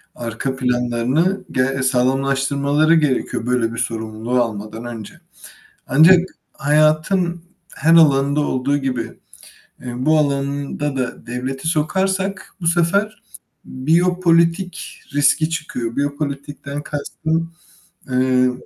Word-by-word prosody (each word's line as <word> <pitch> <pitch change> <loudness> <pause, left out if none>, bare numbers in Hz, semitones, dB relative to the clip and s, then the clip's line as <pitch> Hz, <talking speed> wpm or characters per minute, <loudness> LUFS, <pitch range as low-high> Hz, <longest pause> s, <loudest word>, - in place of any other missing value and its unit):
arka 120 +3 -4
planlarını 125 +9 0
ge 130 +1 0
sağlamlaştırmaları 135 +4 +2
gerekiyor 135 -6 0
böyle 120 -2 0
bir 115 - -5
sorumluluğu 110 +2 -2
almadan 110 +1 -6
önce. 115 -4 -7 0.7
Ancak 165 +6 +7 0.3
hayatın 155 +4 +2 0.3
her 160 +4 +3
alanında 140 -2 +4
olduğu 140 0 0
gibi, 130 -3 -2 0.8
eee, 125 -1 -6
bu 155 0 +4
alanında 140 0 -1
da 125 -1 -4
devleti 130 +4 -4
sokarsak 190 +5 -1
bu 165 - -4
sefer 200 +6 +1 0.4
biyopolitik 170 +4 +1
riski 145 +3 +3
çıkıyor. 125 -8 -4
Biyopolitikten 145 0 -4
kastım, 160 +3 -3 0.6
eee 125 0 +3
140 Hz, 95 wpm, -19 LUFS, 125-165 Hz, 0.8 s, Ancak